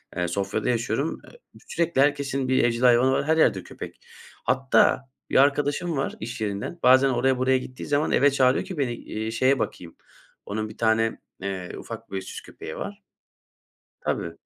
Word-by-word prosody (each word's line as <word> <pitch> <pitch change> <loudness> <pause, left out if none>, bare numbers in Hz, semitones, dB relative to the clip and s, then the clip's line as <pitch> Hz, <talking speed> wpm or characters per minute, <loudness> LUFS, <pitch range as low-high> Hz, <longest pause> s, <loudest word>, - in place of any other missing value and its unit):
eee, 90 0 0
Sofya'da 100 +5 -2
yaşıyorum. 120 +5 -1
Eee, 485 - -18 0.3
sürekli 170 -5 +1
herkesin 140 -2 +1
bir 130 0 +3
evcil 120 0 +1
hayvanı 125 +1 +5
var, 135 - +1
her 160 +2 +2
yerde 105 - +3
köpek. - - -9 0.5
Hatta 130 +1 +3 0.3
bir - - -4
arkadaşım 145 +4 +2
var, 135 - -2
iş 115 +1 -6
yerinden. 105 +10 -3
Bazen 130 +2 +6
oraya 130 +1 +2
buraya 130 +1 +3
gittiği 130 0 -7
zaman 145 +1 +1
eve 145 +1 +4
çağırıyor 130 +3 +3
ki 185 -3 -7
beni, 130 -4 0
iii, 110 -1 -5
şeye 130 +4 +2
bakayım. 85 -6 -5 0.5
Onun 110 +1 -3
bir 110 - -12
tane, 115 0 +1 0.2
eee, 95 -2 -4
ufak - - -9
böyle, 95 -1 -3
süs 95 - -8
köpeği - - -9
var. - - -6 1.0
Tabii. 85 - -2
130 Hz, 170 wpm, -25 LUFS, 110-140 Hz, 1.0 s, Bazen